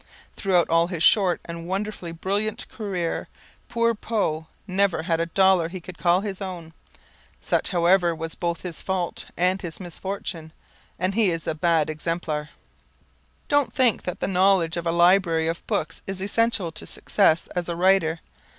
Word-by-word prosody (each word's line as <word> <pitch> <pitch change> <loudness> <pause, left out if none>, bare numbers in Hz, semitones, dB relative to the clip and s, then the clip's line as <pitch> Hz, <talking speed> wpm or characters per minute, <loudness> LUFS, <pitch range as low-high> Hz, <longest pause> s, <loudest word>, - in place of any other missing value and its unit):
Throughout 180 -4 +2
all 165 +1 +3
his 175 -3 -2
short 190 -5 +4
and 170 0 -7
wonderfully 195 -2 -3
brilliant 205 +6 -2
career, 185 -7 -3 0.4
poor 230 0 +2
Poe 195 -8 -2 0.2
never 190 -3 +1
had 165 -1 0
a 165 - 0
dollar 190 -1 +3
he 185 +1 -6
could 175 0 -11
call 175 +1 +3
his 200 -2 -5
own. 175 -4 -6 0.7
Such, - - 0
however, 175 -1 +3
was 160 0 -5
both 170 -1 -3
his 175 -3 -5
fault 185 -3 -2
and 185 +2 +2
his 165 -4 -6
misfortune 175 -3 -6 0.4
and 185 +2 0
he 215 -2 +3
is 165 -2 -3
a - - -1
bad 160 -1 +2
exemplar. 155 -1 -3 1.0
Don't 290 -2 +2
think 250 -5 +3
that 180 - -5
the - - 0
knowledge 185 -3 +3
of 170 0 -3
a - - +2
library 170 -1 +4
of 165 +1 -4
books 160 +1 -2
is 195 -1 -4
essential 205 -2 +1
to - - -5
success 170 -5 +2
as 175 -1 -2
a 170 - -2
writer. 175 -2 +3
180 Hz, 165 wpm, -24 LUFS, 165-195 Hz, 1.0 s, short